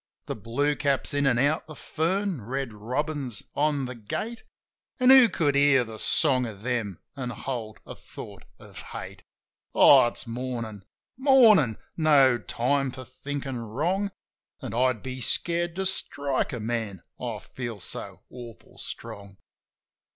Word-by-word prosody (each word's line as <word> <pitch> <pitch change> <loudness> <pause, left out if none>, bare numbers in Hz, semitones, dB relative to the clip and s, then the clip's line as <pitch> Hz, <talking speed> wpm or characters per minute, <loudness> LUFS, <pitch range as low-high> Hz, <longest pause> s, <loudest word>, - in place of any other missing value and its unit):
The - - -4
blue 120 +8 0
cap's 140 0 0
in 145 -1 +2
an' 125 -3 +3
out 145 +4 +1
the 155 - -9
fern, 175 - -1
red 130 +1 -3
robin's 125 +2 -3
on 145 -2 +1
the 125 - -5
gate, 210 - -5 0.6
An' 255 +1 +6
who 260 -3 +9
could 145 -7 +1
hear 140 -2 +5
the 110 -2 -9
song 130 -5 +3
of 105 -2 -9
them 115 -7 -2 0.2
and 125 -3 -4
hold 120 -3 -5
a - - -8
thought - - -11
of - - -14
hate? - - -8 0.5
Oh, - - +8
it's 120 - -2
Mornin'! 115 -4 -5 0.3
Mornin'! 230 - +6 0.2
No 140 -6 +5
time 135 +4 0
for 130 +1 -8
thinkin' 135 0 -5
wrong. 165 - -1 0.5
An' - - -6
I'd 125 -2 +1
be 130 0 -5
scared 170 +6 0
to 190 +1 -2
strike 140 -7 -1
a 120 - -4
man, 110 -4 -3 0.2
I 120 -3 -4
feel 120 0 -7
so 90 - -4
awful 120 -2 -12
strong. 100 -1 -7
130 Hz, 145 wpm, -26 LUFS, 115-150 Hz, 0.6 s, who